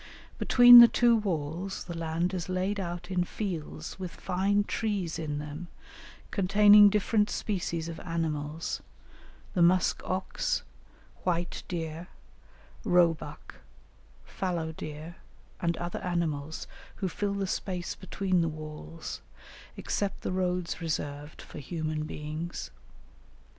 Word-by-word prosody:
Between 245 -1 +10
the 235 - +11
two 235 0 +4
walls 180 -2 -2
the 170 - -7
land 165 +2 -1
is 180 -1 -3
laid 185 +2 -1
out 175 0 -5
in 180 -1 +2
fields 175 -4 -5
with 185 -2 -5
fine 195 +2 +1
trees 200 -7 -2
in 150 -2 -3
them, 150 +4 -6 0.6
containing 205 +1 +7
different 210 +1 +2
species 170 -5 -2
of 165 -1 -6
animals, 160 -2 -3 0.7
the 180 - +1
musk 180 +2 +4
ox, 185 +1 -1 0.6
white 175 -1 -1
deer, 165 -1 -4 0.8
roe 175 -2 +5
buck, 160 - -10 0.7
fallow 170 -4 -3
deer, 155 +2 -8 0.4
and 170 -2 0
other 175 0 -4
animals, 160 -5 -2 0.3
who 190 - -2
fill 200 +3 -2
the 200 -1 -1
space 180 -1 -3
between 185 -1 -1
the 165 - +1
walls, 150 - -7 0.6
except 200 -1 -2
the - - -3
roads 180 -1 -1
reserved 150 -2 -4
for - - -10
human 155 0 -3
beings. 155 +3 -5
175 Hz, 120 wpm, -29 LUFS, 160-190 Hz, 0.8 s, the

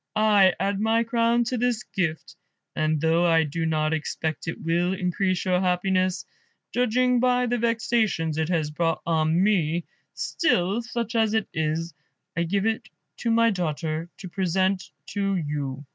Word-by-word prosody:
I 205 -3 +5
add 200 0 0
my 225 +2 +2
crown 235 0 +2
to 240 +1 -2
this 240 -3 0
gift, 165 -5 -3 0.4
and 155 0 +1
though 165 +2 +2
I 165 -1 +4
do 160 +2 -2
not 155 -1 +1
expect 160 0 -3
it 165 - -4
will 175 +3 0
increase 185 0 -1
your 180 -1 +2
happiness, 185 0 +1 0.5
judging 250 +1 +2
by 250 0 +2
the 245 0 0
vexations 220 -8 0
it 160 +1 0
has 160 -4 0
brought 165 +1 -1
on 160 +1 +2
me, 175 -5 +1 0.3
still, 200 - +1
such 235 -1 -4
as 225 -1 +2
it 220 - 0
is, 160 +2 -2 0.4
I 170 - 0
give 195 +4 0
it 225 0 -1 0.3
to 235 - -2
my 230 0 +4
daughter 160 -2 -3
to 190 - -8
present 190 +1 0 0.2
to 195 -1 -1
you." 145 -4 -3
185 Hz, 160 wpm, -25 LUFS, 165-220 Hz, 0.5 s, I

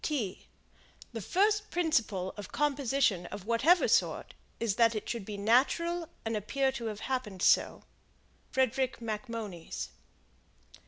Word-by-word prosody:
The 225 - -4
first 415 - +2
principle 230 - 0
of 205 -2 -8
composition 270 -10 +1
of 195 - -8
whatever 295 +11 +4
sort - - +1 0.3
is 230 -3 0
that 230 -1 +4
it 215 - -4
should 230 -5 -3
be 205 0 -6
natural 290 +11 +2 0.2
and 225 0 -1
appear 265 +6 0
to 240 -3 -6
have 215 -1 -5
happened 245 -8 -3
so. - - +3 0.7
Frederick 260 0 0
Macmonnies. 215 -5 -5
235 Hz, 120 wpm, -31 LUFS, 210-275 Hz, 0.7 s, whatever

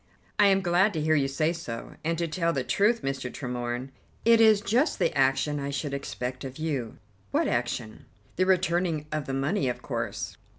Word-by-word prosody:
"I 205 - +7
am 195 -1 +4
glad 185 +4 +3
to 160 - -2
hear 155 +1 +2
you 140 -3 +3
say 155 +5 0
so, 120 -9 -7
and 165 +1 0
to 170 0 -1
tell 170 +1 0
the 135 - -1
truth, 205 - +2
Mr. 135 -2 -3
Tremorne, 125 0 -4 0.3
it 230 0 +6
is 220 -2 +7
just 230 +9 +1
the - - +1
action 135 +2 +2
I 140 0 -3
should 140 0 -3
expect 125 -2 -4
of 135 -1 -7
you." 145 -8 -3 0.3
"What - - +1
action?" 120 -2 -2 0.3
"The 185 +1 +2
returning 175 -4 +1
of 155 -2 -2
the 135 - -2
money, 140 +2 0
of 125 - -5
course." - - -4
150 Hz, 195 wpm, -27 LUFS, 135-180 Hz, 0.3 s, I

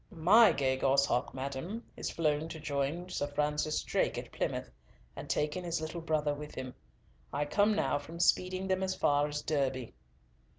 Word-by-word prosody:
"My 210 +5 +6
gay 130 -1 +1
gosshawk, 135 -2 +2
madam, 140 - -4
is - - -3
flown 155 -1 0
to 160 - -7
join 150 +3 -2
Sir 145 -5 -2
Francis 150 +1 0
Drake - - 0
at - - -6
Plymouth, 65 - -3 0.4
and - - -8
taken 150 +5 0
his 170 -1 -1
little 160 +2 -5
brother 155 -2 0
with 150 +1 -8
him. 130 -1 -5 0.6
I 145 +1 -1
come 205 +7 +3
now 145 - +1
from 160 +4 -10
speeding 185 +2 +2
them 190 0 +1
as 190 0 -1
far 145 -4 +2
as 150 0 -4
Derby." 135 -5 -1
150 Hz, 170 wpm, -32 LUFS, 145-175 Hz, 0.6 s, My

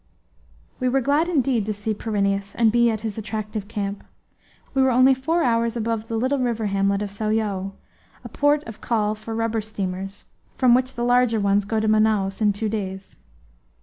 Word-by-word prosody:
We 255 -1 +1
were 270 +2 +2
glad 290 +6 +1
indeed 265 - +1
to 215 - 0
see 210 +2 -3
Pyrineus 200 -2 -1
and 230 -2 +3
be 235 +1 +4
at 220 -2 -2
his 220 -1 -4
attractive 215 -1 -5
camp. 205 -2 -4 0.7
We 270 - +2
were 265 - +4
only 255 +2 +5
four 320 +6 0
hours 230 -1 +1
above 225 -1 -2
the 225 - -2
little 260 +4 0
river 235 -3 -1
hamlet 200 0 +1
of 205 - -5
Sao 215 +1 -2
Joao, 200 -3 -1 0.5
a - - -8
port 290 +1 +2
of 225 -2 -10
call 215 -3 0
for 220 +1 -7
rubber 225 0 -1
steamers, 195 -2 -5 0.3
from 255 -2 +5
which 255 +1 +1
the 240 - -2
larger 245 -2 +3
ones 200 0 +2
go 220 +1 -1
to 220 - 0
Manaos 215 -2 +2
in 210 -1 +4
two 205 +2 -3
days. 195 -3 -5
220 Hz, 190 wpm, -23 LUFS, 205-240 Hz, 0.7 s, only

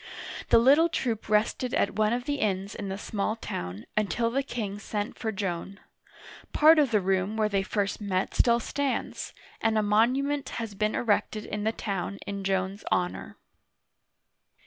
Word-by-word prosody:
The - - +7
little 285 +8 +6
troop 230 -9 -2
rested 220 +4 +1
at 200 - +1
one 215 0 +2
of 245 +1 -1
the 285 +2 -2
inns 195 -2 -1
in 200 -2 -5
the 190 - -3
small 205 +1 -2
town, 90 - -6
until 215 +3 +1
the 270 +3 +1
king 215 -7 -4
sent 210 +1 -4
for 220 - -3
Joan. 195 -1 -4 0.7
Part 315 +1 +7
of 285 -3 +4
the 215 -2 +3
room 190 +2 0
where 215 -1 +3
they 200 -1 +1
first 200 +1 -2
met 190 -2 -1
still 235 -1 +4
stands, 280 +3 -2 0.3
and 225 -1 +2
a 215 - +3
monument 260 +7 +2
has 225 -3 -4
been 215 +2 0
erected 215 -1 0
in 210 0 -4
the 220 - +3
town 200 -3 -3
in 200 -1 -4
Joan's 190 +1 -1
honor. 180 0 -1
215 Hz, 170 wpm, -28 LUFS, 195-235 Hz, 0.7 s, The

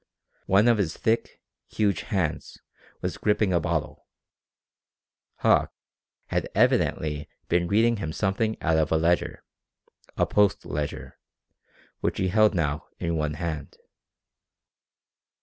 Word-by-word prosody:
One 100 +4 +4
of 115 -3 +4
his 85 -5 -1
thick, 115 +1 -1 0.2
huge 105 -3 0
hands 95 -9 -2 0.4
was - - -3
gripping 105 -2 +2
a 85 - +3
bottle. 85 -2 -3 1.3
Hauck - - +3 0.6
had - - -1
evidently 75 -1 +1 0.2
been 85 0 +2
reading 115 +4 +3
him 80 -6 -4
something 110 +5 -1
out 80 -1 +2
of 80 - +1
a 80 - +4
ledger, 85 +2 0 0.7
a - - +3
Post 105 -1 +2
ledger, 75 -1 -5 0.8
which - - -1
he 95 - 0
held 110 +1 +4
now 75 -3 -1
in 85 -1 -2
one 75 -1 -1
hand. 80 -4 -5
85 Hz, 120 wpm, -26 LUFS, 80-105 Hz, 1.3 s, One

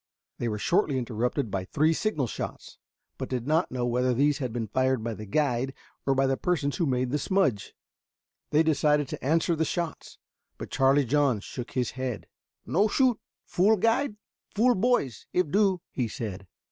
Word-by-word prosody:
They 120 - -1
were 105 -2 -2
shortly 155 - +1
interrupted 120 0 -2
by 95 -1 -2
three 155 - +2
signal 165 -7 0
shots, 115 - -7 0.4
but - - -4
did 125 -2 -2
not 160 +5 +2
know 125 -1 -2
whether 125 +1 +1
these 145 +2 +2
had 130 -4 -3
been 115 -1 -2
fired 130 +2 0
by 115 0 -2
the 105 0 -8
guide 135 +1 0 0.3
or 135 - +3
by 135 +1 +3
the 135 0 +2
persons 155 -6 -1
who 170 - +1
had - - 0
made 125 0 0
the 150 - 0
smudge. 135 - 0 0.7
They 155 +2 +4
decided 150 -2 +2
to - - -6
answer 165 +4 +2
the 160 - +1
shots, 170 +1 -4 0.4
but - - -8
Charlie 135 +1 +3
John 135 -3 +2
shook 120 +4 -7
his 125 -2 0
head. 130 -4 -4 0.4
"No 200 +6 +2
shoot. 250 +1 +2 0.3
Fool 210 +5 +3
guide, 230 +4 +1 0.4
fool 245 +4 +4
boys 190 - 0
if 180 -5 +1
do," 195 -3 +2
he 125 -3 -1
said. 105 -5 -6
140 Hz, 185 wpm, -27 LUFS, 120-165 Hz, 0.7 s, They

